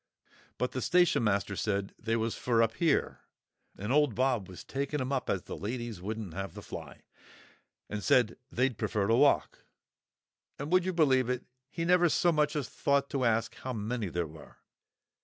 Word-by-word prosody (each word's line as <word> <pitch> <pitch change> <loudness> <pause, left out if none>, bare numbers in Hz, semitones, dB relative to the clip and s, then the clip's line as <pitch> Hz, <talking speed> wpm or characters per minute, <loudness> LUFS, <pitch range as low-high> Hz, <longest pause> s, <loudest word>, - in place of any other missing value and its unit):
But 125 - -1
the 130 - -3
station 175 -3 +3
master 100 -2 +1
said 100 -1 -1
they 115 0 -1
was 115 0 0
for 115 -2 +2
up 115 0 0
here, 165 -4 +1 0.6
and 105 +4 -3
old 145 -6 +3
Bob 125 -6 +1
was 90 - -9
taking 140 +2 -3
'em 130 0 -2
up 135 -2 -1
as 95 - 0
the - - -7
ladies 115 -2 -5
wouldn't 105 -2 -5
have 95 +2 -5
the - - -8
fly; - - -9 1.0
said 115 +2 +3 0.2
they'd 130 -3 0
pefer 105 -2 0
to 110 - +2
walk. 140 +3 +3 1.0
And, 145 +3 -5
would 185 -1 +4
you 185 - 0
believe 130 -7 +3
it, 125 -1 -1 0.3
he 165 - -3
never 175 0 +5
so 175 +3 +3
much 150 -2 +1
as 145 -4 -1
thought 140 0 0
to 135 -3 0
ask 115 0 +1
how 130 - -5
many 110 0 -2
there 85 0 -1
were. 80 -1 -13
125 Hz, 180 wpm, -30 LUFS, 105-140 Hz, 1.0 s, never